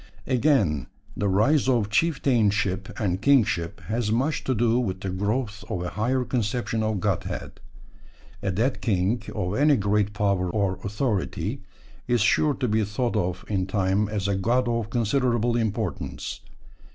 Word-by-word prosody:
Again, 120 Hz, -, +2 dB, 0.3 s
the 105 Hz, -, -1 dB
rise 130 Hz, +9 st, +3 dB
of 115 Hz, -5 st, +1 dB
chieftainship 105 Hz, -, +1 dB
and 95 Hz, -3 st, -1 dB
kingship 105 Hz, -9 st, +2 dB
has 110 Hz, 0 st, -2 dB
much 135 Hz, +7 st, 0 dB
to 130 Hz, -, +1 dB
do 115 Hz, +2 st, +2 dB
with 95 Hz, -6 st, -2 dB
the 95 Hz, -, -3 dB
growth 105 Hz, +2 st, -2 dB
of 90 Hz, -, -2 dB
a 90 Hz, -, -3 dB
higher 125 Hz, +4 st, 0 dB
conception 115 Hz, -1 st, -1 dB
of 110 Hz, -2 st, 0 dB
godhead; 100 Hz, -2 st, -3 dB, 0.8 s
a 100 Hz, -, -1 dB
dead 115 Hz, +8 st, 0 dB
king 105 Hz, +2 st, +1 dB
of 90 Hz, +1 st, -2 dB
any 145 Hz, +5 st, +4 dB
great 105 Hz, -1 st, +1 dB
power 100 Hz, -4 st, +1 dB
or 95 Hz, -1 st, 0 dB
authority 105 Hz, 0 st, -2 dB, 0.5 s
is 120 Hz, -2 st, +2 dB
sure 145 Hz, +6 st, +3 dB
to 130 Hz, -, -1 dB
be 110 Hz, 0 st, +2 dB
thought 115 Hz, +4 st, -2 dB
of 90 Hz, -3 st, -1 dB
in 95 Hz, -3 st, -1 dB
time 95 Hz, +1 st, +1 dB
as 100 Hz, -2 st, -2 dB
a 100 Hz, -, +1 dB
god 120 Hz, +6 st, +1 dB
of 115 Hz, -2 st, -1 dB
considerable 120 Hz, 0 st, +1 dB
importance. 110 Hz, -4 st, -3 dB
105 Hz, 150 wpm, -25 LUFS, 100-120 Hz, 0.8 s, any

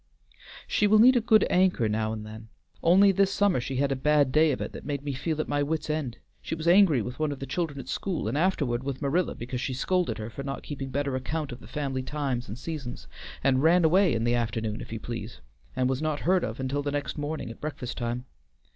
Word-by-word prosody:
She 210 Hz, -, +2 dB
will 215 Hz, +1 st, +5 dB
need 250 Hz, +4 st, +7 dB
a 245 Hz, -, +4 dB
good 220 Hz, -1 st, +5 dB
anchor 180 Hz, -10 st, +3 dB
now 110 Hz, +1 st, -1 dB
and 110 Hz, -1 st, -5 dB
then. 110 Hz, +1 st, -10 dB, 0.3 s
Only 195 Hz, +4 st, +6 dB
this 195 Hz, 0 st, +2 dB
summer 200 Hz, -8 st, +2 dB
she 135 Hz, +2 st, -4 dB
had 140 Hz, +1 st, +1 dB
a -, -, +1 dB
bad 145 Hz, 0 st, +3 dB
day 155 Hz, +2 st, +4 dB
of 130 Hz, -, -2 dB
it -, -, -4 dB
that -, -, -9 dB
made 140 Hz, -1 st, -3 dB
me 145 Hz, -1 st, -3 dB
feel 155 Hz, +4 st, -2 dB
at -, -, -1 dB
my 145 Hz, 0 st, 0 dB
wits' 155 Hz, +1 st, -1 dB
end. 140 Hz, -6 st, -3 dB, 0.2 s
She -, -, -4 dB
was 160 Hz, +1 st, -5 dB
angry 170 Hz, -, +5 dB
with 125 Hz, +5 st, -7 dB
one 155 Hz, -1 st, 0 dB
of 140 Hz, -, -4 dB
the 135 Hz, -, -6 dB
children 145 Hz, 0 st, -3 dB
at 130 Hz, -, -8 dB
school, 185 Hz, +4 st, -2 dB
and -, -, -1 dB
afterward 145 Hz, -8 st, +1 dB
with 135 Hz, -1 st, -4 dB
Marilla 155 Hz, +5 st, 0 dB
because 125 Hz, +1 st, -5 dB
she 130 Hz, -, -2 dB
scolded 175 Hz, -4 st, 0 dB
her 110 Hz, +1 st, -6 dB
for 140 Hz, -, -7 dB
not 135 Hz, 0 st, -5 dB
keeping 135 Hz, -2 st, -5 dB
better 140 Hz, 0 st, -1 dB
account 145 Hz, +3 st, -3 dB
of 125 Hz, -, -7 dB
the -, -, -13 dB
family 140 Hz, -3 st, -3 dB
times 130 Hz, -3 st, -3 dB
and 105 Hz, +3 st, -6 dB
seasons, 140 Hz, -3 st, -6 dB, 0.4 s
and 130 Hz, -1 st, +3 dB
ran 165 Hz, +2 st, +5 dB
away 180 Hz, -2 st, +4 dB
in 115 Hz, -, 0 dB
the 120 Hz, +1 st, +2 dB
afternoon, 115 Hz, -2 st, -2 dB
if -, -, -9 dB
you 115 Hz, -, -4 dB
please, 115 Hz, -1 st, -6 dB, 0.4 s
and 130 Hz, -, +1 dB
was 130 Hz, +1 st, -1 dB
not 155 Hz, -2 st, -1 dB
heard 185 Hz, +1 st, +3 dB
from 110 Hz, -, -3 dB
until 130 Hz, +2 st, -2 dB
next 145 Hz, +1 st, -3 dB
morning 145 Hz, -4 st, -4 dB
at -, -, -13 dB
breakfast 145 Hz, -5 st, -5 dB
time. 120 Hz, +1 st, -3 dB
140 Hz, 245 wpm, -27 LUFS, 125-160 Hz, 0.4 s, need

